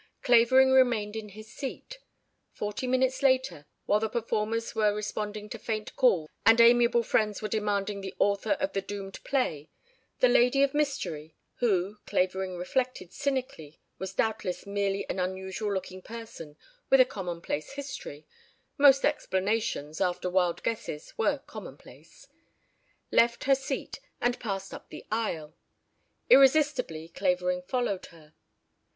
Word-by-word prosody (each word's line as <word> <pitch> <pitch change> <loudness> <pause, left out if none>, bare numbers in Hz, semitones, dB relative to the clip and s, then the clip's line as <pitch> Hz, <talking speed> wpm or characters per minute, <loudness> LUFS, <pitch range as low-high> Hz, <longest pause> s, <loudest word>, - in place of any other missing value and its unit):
Clavering 260 +2 +5
remained 235 -5 +3
in 220 -1 -6
his 215 +2 -12
seat. 405 - -7 0.5
Forty 210 +5 -4
minutes 260 +1 +1
later, 260 - +1 0.2
while 205 - +3
the 220 0 -1
performers 230 0 -2
were 210 -2 +2
responding 210 0 -4
to 230 - -7
faint 215 -1 -4
calls 185 - +3 0.2
and 225 +1 +6
amiable 235 0 +5
friends 210 -2 +1
were 215 - -3
demanding 205 -1 -1
the 190 -1 -7
author 200 +6 +2
of 285 0 -2
the 195 - 0
doomed 195 -1 -7
play, 165 - -1 0.5
the 255 - +5
lady 250 +3 +4
of 280 - +1
mystery 170 - -2 0.2
(who, 205 -3 0
Clavering 185 0 -1
reflected 185 -1 -2
cynically, 255 - -3 0.2
was 190 0 -6
doubtless 215 -5 -1
merely 200 0 -1
an - - -3
unusual 190 +3 -3
looking 185 -1 -4
person 200 -10 -10 0.3
with 270 - +6
a 255 - +8
commonplace 175 - -5
history 270 - -7 0.5
most 275 -1 +6
explanations 190 - -1
after 180 0 0
wild 180 -2 +1
guesses 155 -9 -4
were 450 - +1
common - - -9
place) - - -17 0.8
left 235 0 +3
her 275 - +4
seat 270 0 -3 0.2
and 245 0 0
passed 195 -4 -4
up - - -10
the - - -10
aisle. 170 -9 -2 0.7
Irresistibly, 270 - +4
Clavering 180 0 0
followed 200 -1 -2
her. 155 -2 -18
210 Hz, 135 wpm, -28 LUFS, 185-250 Hz, 0.8 s, a